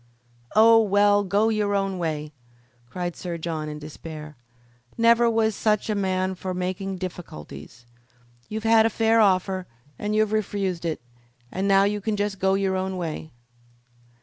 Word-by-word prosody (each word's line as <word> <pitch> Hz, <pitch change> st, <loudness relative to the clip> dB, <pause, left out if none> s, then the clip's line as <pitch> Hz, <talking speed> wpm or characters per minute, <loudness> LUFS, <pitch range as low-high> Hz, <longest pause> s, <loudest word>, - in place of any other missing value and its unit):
"Oh, 225 Hz, +1 st, +7 dB
well, 205 Hz, 0 st, +3 dB
go 205 Hz, +3 st, +2 dB
your 210 Hz, -2 st, 0 dB
own 195 Hz, -2 st, -1 dB
way!" 155 Hz, -3 st, -3 dB, 0.6 s
cried 175 Hz, +3 st, -4 dB
Sir 175 Hz, -2 st, -5 dB
John, 160 Hz, -2 st, -4 dB
in 150 Hz, -, -6 dB
despair. 150 Hz, 0 st, -9 dB, 0.6 s
"Never 235 Hz, 0 st, +5 dB
was 220 Hz, -1 st, +1 dB
such 215 Hz, +1 st, 0 dB
a -, -, +1 dB
man 190 Hz, -2 st, 0 dB
for 185 Hz, 0 st, -5 dB
making 185 Hz, +1 st, -3 dB
difficulties. 120 Hz, -, -9 dB, 0.6 s
You've 215 Hz, 0 st, -4 dB
had 225 Hz, 0 st, +5 dB
a -, -, -1 dB
fair 225 Hz, +1 st, +2 dB
offer 190 Hz, -2 st, +1 dB, 0.3 s
and 210 Hz, +1 st, -2 dB
you've 215 Hz, -1 st, +2 dB
refused 195 Hz, -5 st, -2 dB
it, 160 Hz, -5 st, -2 dB, 0.5 s
and 190 Hz, +2 st, -2 dB
now 195 Hz, 0 st, +5 dB
you 205 Hz, +1 st, 0 dB
can 215 Hz, +1 st, -1 dB
just 205 Hz, -1 st, -2 dB
go 190 Hz, +1 st, +2 dB
your 195 Hz, -1 st, 0 dB
own 190 Hz, 0 st, -2 dB
way." 160 Hz, -2 st, -5 dB
195 Hz, 155 wpm, -24 LUFS, 175-210 Hz, 0.6 s, Oh